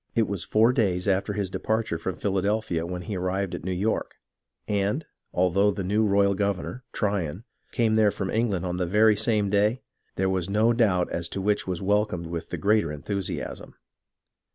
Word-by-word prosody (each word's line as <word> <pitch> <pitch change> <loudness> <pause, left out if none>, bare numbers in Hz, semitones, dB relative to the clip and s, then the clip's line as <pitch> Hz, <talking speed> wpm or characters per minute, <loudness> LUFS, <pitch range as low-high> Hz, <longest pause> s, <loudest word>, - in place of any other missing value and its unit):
It 115 -2 +3
was 95 -4 -3
four 115 +3 +3
days 95 -7 +1
after 100 +1 +1
his 100 -2 -2
departure 110 -6 -1
from 90 +1 -3
Philadelphia 100 -2 -1
when 90 0 -5
he 105 0 -4
arrived 95 +1 -1
at - - -5
New 95 - -2
York, 100 +5 -1 0.5
and, 105 +8 0 0.3
although 95 +3 +3
the 100 -1 -2
new 105 +4 +2
royal 100 0 +3
governor, 100 +5 -2
Tryon, 100 -3 -2 0.3
came 115 -2 +2
there 110 -1 +5
from 95 -1 -3
England 105 -6 0
on 90 0 -2
the 90 -1 -1
very 105 +3 +5
same 105 -2 +1
day, 105 +4 +2 0.3
there 95 - +1
was 95 -1 -1
no 110 +4 +3
doubt 100 -7 +2
as 85 -1 -2
to - - -4
which 105 +1 0
was 90 0 -3
welcomed 100 -3 +1
with 85 0 -5
the - - -3
greater 100 -6 +2
enthusiasm. 95 +6 -5
100 Hz, 180 wpm, -26 LUFS, 90-105 Hz, 0.5 s, there